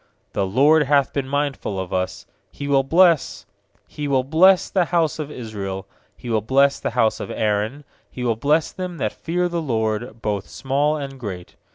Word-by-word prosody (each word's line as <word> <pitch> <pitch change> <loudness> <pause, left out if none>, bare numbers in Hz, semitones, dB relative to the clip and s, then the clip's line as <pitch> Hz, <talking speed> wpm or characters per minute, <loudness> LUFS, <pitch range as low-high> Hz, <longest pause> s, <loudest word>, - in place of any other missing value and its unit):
"The 100 - 0
LORD 145 +10 +4
hath 140 -1 +3
been 140 -2 -2
mindful 140 -8 -2
of 95 -1 -5
us, 95 0 -2 0.2
He 140 - -7
will 140 -1 +4
bless 165 +3 +3 0.2
— - - -40
He 150 -1 -5
will 135 -2 +2
bless 175 +7 +5
the 185 -3 +1
house 165 -3 0
of 150 -2 -4
Israel; 100 -7 -6 0.3
He - - -11
will 110 -2 +1
bless 135 +5 +3
the - - -2
house 115 -2 +1
of - - -6
Aaron. 110 +6 -1 0.3
13He 125 - -3
will 115 -2 +1
bless 150 +7 +1
them 180 -2 -6
that - - -2
fear 180 +2 -1
the 170 -1 -2
LORD, 110 -3 -2
Both 105 -3 -2
small 145 +3 0
and 135 -2 -7
great. 95 -7 -7
135 Hz, 190 wpm, -22 LUFS, 110-150 Hz, 0.3 s, bless